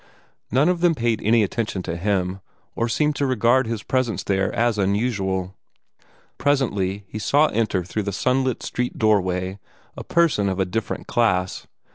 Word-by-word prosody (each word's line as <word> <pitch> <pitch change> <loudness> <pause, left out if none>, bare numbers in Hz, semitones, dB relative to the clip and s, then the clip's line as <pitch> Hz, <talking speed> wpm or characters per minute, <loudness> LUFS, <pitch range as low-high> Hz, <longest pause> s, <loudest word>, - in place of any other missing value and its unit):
None 135 +7 +3
of 180 -1 +1
them 175 -2 +4
paid 115 -4 0
any 110 +1 +4
attention 105 -2 -2
to 85 - -4
him, 95 0 -1 0.4
or 115 0 -1
seemed 150 +5 +1
to 140 - +1
regard 125 +1 +3
his 115 -2 -3
presence 130 -4 -1
there 95 -1 0
as 115 -2 +1
unusual. 95 -2 0 0.9
Presently 105 -9 0
he 110 - -6
saw 145 +7 +3
enter 105 -4 0
through 100 +5 -3
the 100 0 -3
sunlit 130 +4 0
street 125 0 -3
doorway 95 -3 +1 0.4
a - - -7
person 160 -13 +2
of 95 0 -3
a 95 - +2
different 110 +5 -3
class. 95 -7 0
110 Hz, 160 wpm, -22 LUFS, 95-125 Hz, 0.9 s, them